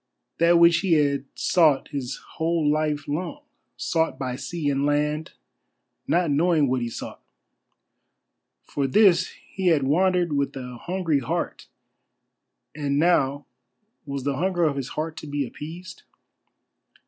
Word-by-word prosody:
That 170 +1 +5
which 170 0 +6
he 185 -1 +1
had 140 -3 +2
sought 155 -6 +3
his 135 -4 -4
whole 165 -1 -2
life 150 -1 0
long; 180 - -4 0.3
sought 165 -1 0
by 130 -2 -3
sea 165 +3 -4
and 140 -1 +1
land, 150 +2 0 0.7
not 170 -2 +2
knowing 155 0 +3
what 130 0 0
he 120 - -2
sought. - - -8 1.4
For 140 -2 -2
this 185 +3 +4 0.2
he 190 -1 -1
had 160 -5 +4
wandered 175 +3 +2
with 140 -1 -1
a 125 -2 -7
hungry 175 -5 0
heart, 125 - -3 1.1
and 140 -2 -1
now 145 -4 +2 0.6
was 140 -1 -4
the 140 -1 -1
hunger 180 +1 0
of 150 -3 +2
his 135 -1 -4
heart 155 +1 -3
to - - -8
be 145 -1 -2
appeased? 165 +8 -9
150 Hz, 135 wpm, -24 LUFS, 140-170 Hz, 1.4 s, which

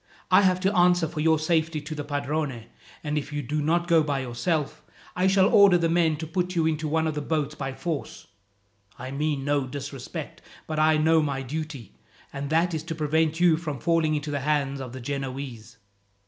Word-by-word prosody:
I 185 +2 +7
have 185 -2 +3
to 195 +2 +1
answer 175 -1 +4
for 155 0 -6
your 160 +1 +3
safety 160 0 0
to 150 +2 -6
the 150 -1 -4
padrone; 145 -3 -3 0.4
and 150 0 -1
if 145 +1 -8
you 145 0 -3
do 150 +4 -2
not 170 +3 +1
go 165 -2 +5
by 145 -2 -1
yourself, 130 +5 -2 0.3
I 180 +1 +2
shall 190 0 +4
order 200 -4 +6
the 170 -1 +1
men 165 -2 +2
to 160 - -5
put 180 +2 -2
you 165 -2 +2
into 155 -1 0
one 160 +1 +1
of 160 - -1
the 150 - -3
boats 150 -1 -1
by 135 -3 -5
force. 165 -5 -5 0.7
I 130 +2 -7
mean 145 -1 -1
no 145 -2 +1
disrespect; 140 -1 -7 0.2
but 155 -1 -3
I 155 0 +4
know 160 +1 +4
my 140 -3 -2
duty, 145 - -6 0.3
and 140 0 -4
that 165 +2 +2
is 160 - -2
to 165 -1 -4
prevent 160 +1 0
you 175 -3 +5
from 155 -4 -4
falling 165 +1 +1
into 150 0 -3
the 145 - -1
hands 140 -1 -1
of 130 -2 -7
the 130 0 -8
Genoese." 130 -4 -5
155 Hz, 205 wpm, -26 LUFS, 140-165 Hz, 0.7 s, I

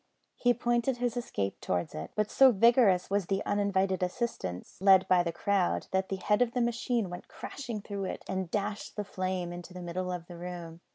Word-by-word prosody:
He 245 -1 +3
pointed 240 +2 +1
his 245 -1 -1
escape 100 - -3
towards 85 -3 -1
it, 80 +2 -5
but 210 0 0
so 265 -1 +7
vigorous 225 -4 +4
was 200 -3 +1
the 195 0 -1
uninvited 195 -2 +1
assistance 180 - -3
lent 190 -1 +6
by 180 -1 +5
the 170 -1 -1
crowd 185 +2 0
that 190 0 0
the 195 - -1
head 210 +4 +1
of 240 -1 +2
the 250 - 0
machine 235 -2 0
went 175 0 -8
crashing 235 -6 -6
through 200 -1 -4
it - - -5
and 190 -2 -2
dashed 205 +2 -3
the 210 - -2
frame 185 -2 -3
into 175 +1 -9
the 180 - -6
middle 180 +1 -3
of 175 -2 -5
the 175 0 -10
room. 170 -1 -7
190 Hz, 205 wpm, -30 LUFS, 180-225 Hz, -, so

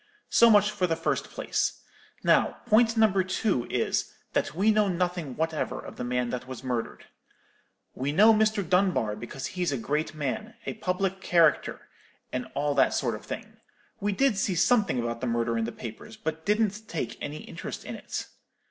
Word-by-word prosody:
So 235 - +7
much 210 -1 +5
for 200 -3 0
the 165 - +1
first 165 - -1
place. - - -2 0.4
Now - - +3
point 225 +1 +4
number 205 -4 +4
two 185 - 0
is, - - 0 0.2
that - - 0
we 205 +5 +4
know 215 -1 +3
nothing 175 -6 -1
whatever 160 0 -2
of - - -10
the - - -4
man 125 0 -1
that 125 0 -4
was 130 -1 -7
murdered. 125 -3 -3 0.9
We 135 +2 -2
know 215 +8 +7
Mr. 215 -3 +2
Dunbar 180 - +2
because 120 +4 -7
he's 180 -3 0
a 135 - -1
great 150 +6 -2
man, 155 - -3
a - - -2
public 190 -2 -2
character, 170 -3 +2 0.5
and 125 0 -2
all 145 0 +1
that 135 -1 +3
sort 120 -4 0
of 105 - -7
thing. 220 0 -7 0.4
We 205 0 0
did 260 +1 +2
see 190 -1 0
something 180 - +3
about 115 0 -3
the 130 - -1
murder 115 0 0
in 115 -1 0
the 115 - -4
papers, 120 - -9
but 160 -5 -4
didn't 210 0 +1
take 165 - -3
any 145 +1 -4
interest - - -7
in - - -5
it. - - -5
175 Hz, 185 wpm, -27 LUFS, 130-210 Hz, 0.9 s, So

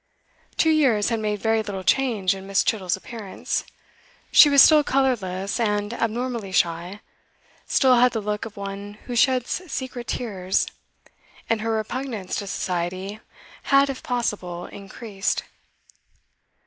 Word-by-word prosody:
Two 320 - +4
years 255 -10 +3
had 230 -1 0
made 210 -1 -2
very 220 0 +2
little 200 -3 -5
change 210 -2 +2
in 195 0 -9
Miss. 195 0 +2
Chittle's 190 -4 0
appearance. 210 -1 -4 0.7
She 295 - +9
was 280 -1 +8
still 305 -2 +6
colourless 205 -9 0
and 210 -1 0
abnormally 230 -2 -2
shy, 175 +3 0 0.7
still 260 -2 +4
had 250 0 +5
the 225 - -1
look 210 0 -3
of 220 -3 -8
one 200 +1 -6
who 245 - -5
sheds 255 +5 +2
secret 255 -2 -5
tears, 190 -6 -1 0.9
and 225 -1 +1
her 225 0 -1
repugnance 220 -2 -3
to 200 - -4
Society 185 +1 -3 0.5
had, 275 0 +4
if 265 - -8
possible, 195 -8 -3
increased. 200 0 -4
215 Hz, 135 wpm, -24 LUFS, 195-245 Hz, 0.9 s, She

